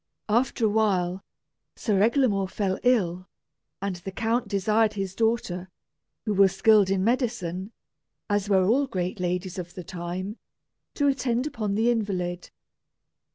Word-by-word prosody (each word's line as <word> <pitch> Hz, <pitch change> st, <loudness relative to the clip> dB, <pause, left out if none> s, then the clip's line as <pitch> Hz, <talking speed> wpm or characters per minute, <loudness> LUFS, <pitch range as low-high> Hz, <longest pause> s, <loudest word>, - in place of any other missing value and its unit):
After 235 Hz, +1 st, +2 dB
a -, -, +4 dB
while, 195 Hz, -4 st, +1 dB, 0.5 s
Sir 205 Hz, -5 st, +1 dB
Eglamour 220 Hz, -4 st, +3 dB
fell 190 Hz, -1 st, -1 dB
ill, 185 Hz, -8 st, +1 dB, 0.6 s
and 195 Hz, -2 st, -2 dB
the 175 Hz, +2 st, -7 dB
count 225 Hz, +4 st, 0 dB
desired 215 Hz, +2 st, +2 dB
his 195 Hz, -2 st, -3 dB
daughter, 195 Hz, -5 st, -1 dB, 0.6 s
who 215 Hz, -, 0 dB
was 195 Hz, -1 st, +4 dB
skilled 205 Hz, -1 st, +5 dB
in 190 Hz, -1 st, +1 dB
medicine, 205 Hz, -6 st, -1 dB, 0.6 s
as 205 Hz, -1 st, 0 dB
were 190 Hz, -2 st, +4 dB
all 265 Hz, +8 st, +3 dB
great 185 Hz, -4 st, -3 dB
ladies 180 Hz, +1 st, -2 dB
of 175 Hz, 0 st, -7 dB
the 180 Hz, -, -6 dB
time, 180 Hz, +5 st, -5 dB, 0.6 s
to 285 Hz, -, +1 dB
attend 255 Hz, -2 st, +1 dB
upon 215 Hz, -9 st, -2 dB
the 225 Hz, +3 st, +3 dB
invalid. 180 Hz, -6 st, -2 dB
200 Hz, 140 wpm, -26 LUFS, 185-225 Hz, 0.6 s, skilled